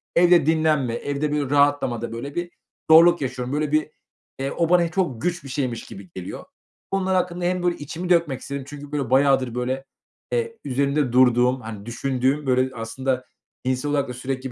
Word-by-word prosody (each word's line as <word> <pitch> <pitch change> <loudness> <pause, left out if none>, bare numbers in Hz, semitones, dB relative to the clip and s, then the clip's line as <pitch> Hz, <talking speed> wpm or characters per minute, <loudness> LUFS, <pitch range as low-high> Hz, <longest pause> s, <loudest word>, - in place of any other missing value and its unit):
evde 175 -3 +5
dinlenme, 155 -6 +2
evde, 145 +3 -2
böyle, 145 -3 -1
rahatlamada, 140 -5 +2
böyle, 140 +5 -6
bir 175 0 -3 0.4
zorluk 170 0 +7
yaşıyorum. 130 0 -3
Böyle, 150 0 -1
bir, 155 0 +1 0.5
eee, 135 +1 -2
o 170 -1 0
bana 175 -2 +4
çok 155 - -1
güç 175 -4 -2
bir 135 - -9
şeymiş 130 -3 -2
gibi 95 -2 -11
geliyor. 90 -1 -7 0.5
Bunlar 190 -1 +1
hakkında 175 -1 -1
hem, 180 0 0
böyle, 175 -1 +1
içimi 165 +5 -6
dökmek 165 -7 +2
istedim. 140 -1 -5
Çünkü, 145 0 -9
böyle, 140 -5 -2
bayağıdır, 130 -2 +3
böyle, 130 +2 -2 0.5
eee, 460 -1 -1
üzerinde 140 0 0
durduğum, 125 0 +4
hani, 110 -2 -8
düşündüğüm, 130 +4 -1
böyle, 130 0 +1
aslında 125 +3 -2 0.4
insan 130 +3 -1
olarak 140 -3 0
da - - -4
sürekli, 130 +1 -4
140 Hz, 175 wpm, -23 LUFS, 125-160 Hz, 0.5 s, zorluk